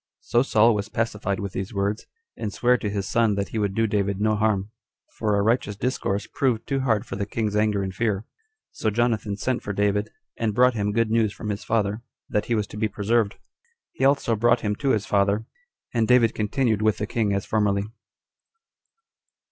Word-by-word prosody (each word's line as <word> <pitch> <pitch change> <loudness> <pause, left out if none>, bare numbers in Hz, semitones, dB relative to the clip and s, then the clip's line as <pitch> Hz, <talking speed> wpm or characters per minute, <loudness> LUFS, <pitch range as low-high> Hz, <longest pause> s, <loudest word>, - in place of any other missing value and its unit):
So 120 - +2
Saul 115 -3 +4
was 105 0 -3
pacified 105 -4 -2
with 100 -2 -4
these 95 +3 -5
words, 100 +2 -1 0.3
and 105 -3 -4
sware 125 +4 +3
to 110 -4 -2
his 100 -1 -3
son 115 -3 +2
that 100 0 -2
he 110 - -3
would 100 -2 -1
do 115 - +2
David 100 -2 0
no 110 +1 +2
harm, 105 -1 0 0.4
for 105 -2 +1
a 100 - +2
righteous 110 -2 +1
discourse 105 -3 -1
proved 120 -4 -1
too 135 -1 -1
hard 115 -6 +1
for - - -6
the 100 0 -3
king's 105 -1 -2
anger 105 -2 +2
and 95 -1 -4
fear. 105 -1 -1 0.5
So 110 - -1
Jonathan 110 -2 0
sent 125 +3 -1
for 100 - -4
David, 105 +1 +1 0.3
and 110 -3 0
brought 125 +1 +5
him 105 -2 -1
good 115 +1 +1
news 110 -2 +2
from 105 - -6
his 105 0 -3
father, 110 -1 0 0.3
that 105 - 0
he 120 - 0
was 105 -2 0
to - - -9
be 110 0 +1
preserved. 105 +1 0 0.6
He - - -4
also 135 -4 +3
brought 120 +2 +3
him 105 -1 -1
to 140 - -1
his 110 -5 +1
father; 100 +2 +1 0.5
and 115 -2 +2
David 125 -3 +5
continued 110 0 0
with 110 -1 +2
the 105 - -2
king 110 -1 0
as 100 0 -1
formerly. 100 -2 +1
105 Hz, 205 wpm, -24 LUFS, 100-115 Hz, 0.6 s, brought